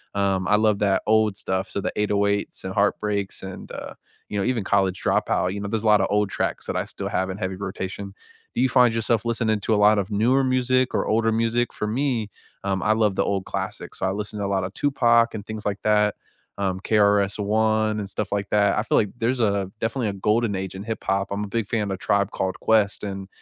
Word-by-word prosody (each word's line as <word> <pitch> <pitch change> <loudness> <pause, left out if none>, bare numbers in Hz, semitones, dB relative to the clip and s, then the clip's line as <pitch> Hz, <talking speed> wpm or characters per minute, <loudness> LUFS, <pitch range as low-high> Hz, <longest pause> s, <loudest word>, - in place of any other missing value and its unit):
um, 95 -2 +1
I 105 - +5
love 105 -2 +2
that 100 -2 +2
old 110 -2 +3
stuff, 95 0 -2
so - - -3
the - - -3
808s 100 -1 0
and 95 - -4
Heartbreaks 100 -1 0
and, 95 -1 -8
uh, - - -7 0.4
you 105 - -3
know, 100 - 0
even 120 -5 0
College 95 -2 +1
Dropout, 90 +1 +1
you 100 - -4
know, 100 - -4
there's 110 +1 -2
a - - 0
lotta 105 -3 +5
old 105 0 +1
tracks - - -2
that - - -2
I - - -1
still - - -5
have 95 +1 -1
in 95 - -4
heavy 95 -2 -3
rotation. 95 0 -5 0.4
Do - - +1
you 130 - +3
find 125 -2 +5
yourself 115 0 0
listening 110 -2 0
to 110 - 0
a - - +4
lot 105 +1 +5
of 100 +1 -3
newer 120 +6 +3
music 130 0 +1
or - - 0
older 115 +1 +2
music? 115 +2 0
For 105 - -3
me, 115 -2 -1 0.3
um, 95 -1 -1
I 110 +2 +3
love 105 -3 +1
the - - +1
old 95 -1 -1
classics, - - -5
so - - -1
I 95 - +1
listen 105 +1 -4
to 100 - -1
a - - -1
lot 95 -1 0
of 95 +2 -5
Tupac 120 -5 +3
and 105 -2 -6
things 110 -1 -7
like 100 -1 -2
that, 105 -1 +2 0.4
um, 95 -2 -1
KRS-One 105 +1 +2
and 100 -2 -4
stuff 105 0 -4
like 100 -1 -2
that, 100 -1 +3
I - - 0
feel - - +1
like 105 - +2
there's 120 +1 0
a 100 -3 +1
definitely 115 0 -1
a 100 - -2
golden 105 +2 +1
age 95 0 -4
in 95 - -6
hip-hop. 100 -3 -1
I'm 100 +1 -2
a - - -4
big 115 -1 -2
fan 105 -3 -1
of 95 - -4
Tribe 100 0 +1
Called 95 -1 -2
Quest, 105 -3 +2
and 95 -1 -5
105 Hz, 235 wpm, -24 LUFS, 100-110 Hz, 0.4 s, I